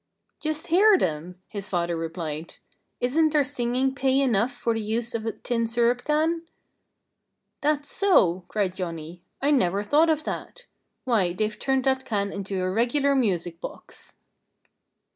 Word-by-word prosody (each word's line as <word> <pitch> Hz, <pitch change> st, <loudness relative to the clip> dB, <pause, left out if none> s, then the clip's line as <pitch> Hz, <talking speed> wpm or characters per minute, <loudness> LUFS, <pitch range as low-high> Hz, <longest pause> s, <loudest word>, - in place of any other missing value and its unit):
"Just 310 Hz, 0 st, -2 dB
hear 395 Hz, +4 st, +5 dB
them!" 175 Hz, -, -3 dB
his 200 Hz, -2 st, -6 dB
father 170 Hz, -2 st, 0 dB
replied. 165 Hz, -1 st, -5 dB, 0.4 s
"Isn't 310 Hz, +5 st, +2 dB
their 300 Hz, -2 st, +4 dB
singing 260 Hz, -1 st, 0 dB
pay 270 Hz, 0 st, +2 dB
enough 245 Hz, -3 st, +2 dB
for 240 Hz, -1 st, -1 dB
the 225 Hz, -, -2 dB
use 225 Hz, +2 st, -2 dB
of 225 Hz, -1 st, -3 dB
a -, -, +1 dB
tin 230 Hz, -2 st, -2 dB
syrup 240 Hz, +2 st, +1 dB
can?" 315 Hz, +2 st, +1 dB, 1.2 s
"That's 290 Hz, -1 st, 0 dB
so!" 190 Hz, -, +3 dB
cried 200 Hz, -4 st, -1 dB
Johnnie. 170 Hz, -1 st, -6 dB, 0.2 s
"I 290 Hz, -, +4 dB
never 200 Hz, -7 st, +2 dB
thought 300 Hz, +9 st, +3 dB
of 310 Hz, -1 st, +1 dB
that. -, -, -6 dB, 0.4 s
Why, 210 Hz, -9 st, +2 dB
they've 215 Hz, +3 st, -2 dB
turned 265 Hz, -1 st, +1 dB
that 265 Hz, 0 st, +1 dB
can 200 Hz, -5 st, -1 dB
into 195 Hz, -1 st, -3 dB
a 185 Hz, -, 0 dB
regular 250 Hz, +7 st, +2 dB
music 180 Hz, -9 st, 0 dB
box!" -, -, -10 dB
235 Hz, 150 wpm, -25 LUFS, 185-280 Hz, 1.2 s, hear